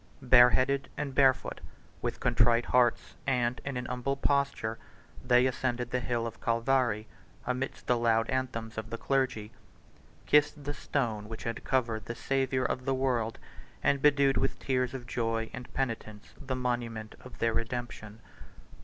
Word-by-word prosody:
Bareheaded 130 Hz, +2 st, +5 dB
and 145 Hz, -2 st, -3 dB
barefoot, 135 Hz, -1 st, +2 dB, 0.4 s
with -, -, -3 dB
contrite 120 Hz, -1 st, +3 dB
hearts, 125 Hz, -2 st, +2 dB
and 125 Hz, -2 st, +1 dB
in 140 Hz, -2 st, -3 dB
an 125 Hz, -, -3 dB
humble 125 Hz, +3 st, -2 dB
posture, 140 Hz, -5 st, 0 dB, 0.4 s
they 125 Hz, 0 st, +4 dB
ascended 125 Hz, -2 st, -1 dB
the 125 Hz, -, +1 dB
hill 120 Hz, -1 st, -1 dB
of 115 Hz, -1 st, -7 dB
Calvary, 115 Hz, -2 st, +1 dB, 0.4 s
amidst 125 Hz, +1 st, -3 dB
the 125 Hz, -1 st, +2 dB
loud 115 Hz, -1 st, +2 dB
anthems 115 Hz, -4 st, -2 dB
of 110 Hz, 0 st, -7 dB
the 115 Hz, -, -4 dB
clergy; 130 Hz, -5 st, -1 dB, 0.7 s
kissed 150 Hz, 0 st, +3 dB
the 145 Hz, +1 st, -3 dB
stone 110 Hz, -8 st, -2 dB
which 115 Hz, -, -7 dB
had 115 Hz, -, -4 dB
covered 115 Hz, -4 st, 0 dB
the 120 Hz, -, -5 dB
Savior 130 Hz, -1 st, 0 dB
of 130 Hz, -, -2 dB
the 135 Hz, -1 st, +1 dB
world; 125 Hz, -4 st, 0 dB, 0.5 s
and 140 Hz, -1 st, +2 dB
bedewed 140 Hz, -2 st, +4 dB
with -, -, 0 dB
tears 130 Hz, -1 st, -1 dB
of 125 Hz, -2 st, -6 dB
joy 115 Hz, -2 st, -2 dB
and 125 Hz, 0 st, -8 dB
penitence 115 Hz, -5 st, -4 dB
the 130 Hz, -2 st, -2 dB
monument 120 Hz, -3 st, -3 dB
of 125 Hz, -2 st, -12 dB
their 115 Hz, -1 st, +1 dB
redemption. 115 Hz, -2 st, -4 dB
125 Hz, 155 wpm, -30 LUFS, 115-130 Hz, 0.7 s, Bareheaded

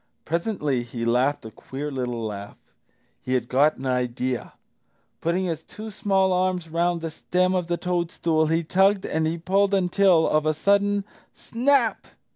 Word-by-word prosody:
Presently 165 Hz, -, -1 dB
he 120 Hz, -1 st, -5 dB
laughed 125 Hz, +3 st, +1 dB
a 110 Hz, -, -8 dB
queer 140 Hz, +6 st, -6 dB
little 125 Hz, -3 st, -3 dB
laugh. 100 Hz, -1 st, -7 dB, 0.6 s
He 130 Hz, -, -1 dB
had 120 Hz, -2 st, -1 dB
got 145 Hz, +5 st, +3 dB
an 135 Hz, -, -8 dB
idea! 125 Hz, 0 st, -2 dB, 0.7 s
Putting 175 Hz, +3 st, 0 dB
his 165 Hz, -3 st, -3 dB
two 215 Hz, +1 st, -9 dB
small 190 Hz, -2 st, +1 dB
arms 180 Hz, -2 st, 0 dB
round 170 Hz, +1 st, 0 dB
the 165 Hz, -1 st, -4 dB
stem 180 Hz, +3 st, 0 dB
of 180 Hz, -2 st, -1 dB
the 175 Hz, 0 st, -1 dB
toadstool 170 Hz, -3 st, 0 dB
he 165 Hz, +2 st, +1 dB
tugged 190 Hz, +4 st, +2 dB
and 160 Hz, 0 st, 0 dB
he 165 Hz, +1 st, -2 dB
pulled 195 Hz, +4 st, +2 dB
until, 180 Hz, -2 st, +3 dB
of 155 Hz, 0 st, +1 dB
a 155 Hz, -, +1 dB
sudden, 200 Hz, +3 st, +2 dB, 0.3 s
snap! 245 Hz, -1 st, +1 dB
165 Hz, 160 wpm, -24 LUFS, 135-190 Hz, 0.7 s, got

